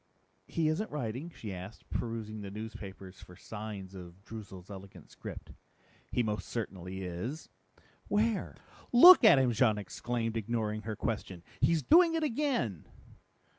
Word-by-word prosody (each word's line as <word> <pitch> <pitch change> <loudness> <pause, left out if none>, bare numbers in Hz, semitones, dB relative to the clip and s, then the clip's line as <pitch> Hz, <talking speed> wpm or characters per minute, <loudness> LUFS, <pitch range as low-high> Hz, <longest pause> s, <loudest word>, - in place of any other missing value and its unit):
"He 165 -2 0
isn't 170 +8 0
writing?" 135 +2 -4
she 105 -3 -6
asked, 95 +4 -9
perusing 110 -2 -4
the 100 - -6
newspapers 100 -3 -8
for 90 - -13
signs 105 -2 -7
of 90 +1 -11
Droozle's 100 -4 -9
elegant 95 -4 -11
script. - - -9 0.6
"He 125 - +1
most 105 -1 -3
certainly 95 -4 -5
is." 95 - -5 0.6
"Where?" 215 +1 0 0.4
"Look 345 +8 +10
at 215 -10 +9
him!" 130 -2 +3
Jean 110 -2 +3
exclaimed, 115 +3 -3
ignoring 110 -1 -2
her 110 - -2
question. 100 -5 -4 0.2
"He's 165 -3 +3
doing 335 +1 +6
it 325 - 0
again!" 240 - -1
110 Hz, 135 wpm, -31 LUFS, 95-135 Hz, 0.6 s, Look